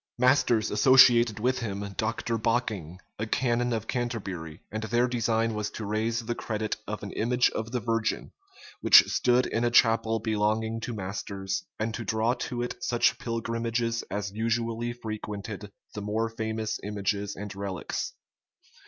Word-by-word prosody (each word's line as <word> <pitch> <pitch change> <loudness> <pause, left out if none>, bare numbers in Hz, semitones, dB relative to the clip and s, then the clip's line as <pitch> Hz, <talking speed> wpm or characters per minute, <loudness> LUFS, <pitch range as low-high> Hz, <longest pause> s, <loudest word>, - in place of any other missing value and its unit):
Masters 120 -3 +3
associated 120 -4 +6
with 130 +3 +1
him 100 -3 -4
Dr. 115 +1 -1
Bocking, 110 -8 -1 0.2
a 110 - -2
canon 120 +1 +1
of 110 -1 -1
Canterbury; 95 -10 -4
and 110 +1 -3
their 120 +3 +2
design 115 -2 +1
was 105 -1 -2
to 110 - -6
raise 110 +2 -1
the 120 - -1
credit 110 -2 -3
of 105 0 -4
an 100 - -5
image 125 +2 +2
of 110 +1 -4
the 125 - 0
Virgin 115 -1 -1 0.5
which - - +9
stood 125 0 +3
in 115 - -1
a 120 - +3
chapel 115 -1 +4
belonging 110 +1 0
to 115 0 -5
Masters, 95 -1 -4
and 110 +1 -2
to 115 - -4
draw 110 +2 +1
to 120 -1 -3
it 120 - -5
such 120 -1 +2
pilgrimages 115 0 -1
as 100 -1 -3
usually 115 +2 -1
frequented 105 -3 -6 0.2
the 105 - -5
more 110 +2 -1
famous 110 -1 -3
images 100 0 -2
and 105 0 -7
relics. 100 -2 -4
110 Hz, 155 wpm, -28 LUFS, 105-120 Hz, 0.5 s, which